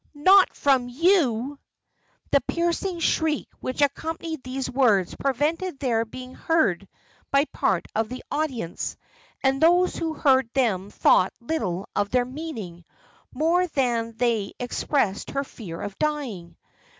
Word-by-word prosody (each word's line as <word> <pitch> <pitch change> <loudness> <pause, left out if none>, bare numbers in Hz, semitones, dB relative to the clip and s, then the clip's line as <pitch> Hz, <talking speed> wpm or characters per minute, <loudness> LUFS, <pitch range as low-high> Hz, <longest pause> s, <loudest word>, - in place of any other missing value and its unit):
not 375 +6 +6
from 265 -3 +2
you!" 280 - +2 0.7
The - - +4
piercing 345 +1 -1
shriek 315 -3 +1
which 255 +3 -1
accompanied 320 +2 -2
these 260 +1 -4
words 225 -9 +2
prevented 295 +6 -1
their 235 -4 0
being 255 +3 -9
heard 200 - +1 0.4
by 275 +1 +3
part - - 0
of 220 0 0
the 255 +1 -7
audience; 265 - -3 0.5
and 270 +1 +2
those 355 +3 +4
who 325 -1 -2
heard 265 -4 +3
them 205 -7 +1
thought 185 -2 +3
little 200 - -3
of 205 0 +1
their 250 +1 +2
meaning, 245 - -7 0.5
more 335 +6 +2
than 245 -7 0
that - - -30
they 230 -5 0
expressed 245 -4 -1
her 275 0 -1
fear 190 -11 -9
of 205 -1 -5
dying. 255 - -3
265 Hz, 135 wpm, -25 LUFS, 225-315 Hz, 0.7 s, not